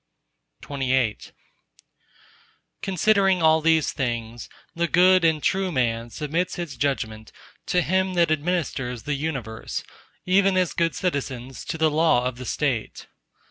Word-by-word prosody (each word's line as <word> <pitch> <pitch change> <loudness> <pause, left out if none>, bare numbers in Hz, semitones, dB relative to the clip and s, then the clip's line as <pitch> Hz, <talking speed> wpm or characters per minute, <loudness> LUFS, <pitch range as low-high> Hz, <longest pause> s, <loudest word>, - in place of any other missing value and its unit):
_ - - -12
XXIX 130 -5 -1 1.5
Considering 195 -1 +2
all 160 0 +5
these 160 -1 +2
things, 120 -4 -4 0.2
the 170 0 0
good 185 +1 +5
and 160 -2 +2
true 190 -1 +1
man 120 -4 -1
submits 155 +8 -2
his 170 -5 -5
judgement 110 -6 -2 0.4
to 180 -1 +2
Him 185 0 0
that 170 -2 +3
administers 145 -7 -2
the 145 - -2
Universe, 135 -7 -4 0.4
even 195 +1 +3
as 180 -2 +1
good 165 -1 0
citizens 135 -7 -3
to - - -4
the 160 -1 +2
law 155 -5 +3
of 125 -1 -2
the 125 - -7
State. 125 -4 -2
155 Hz, 135 wpm, -24 LUFS, 125-175 Hz, 1.5 s, all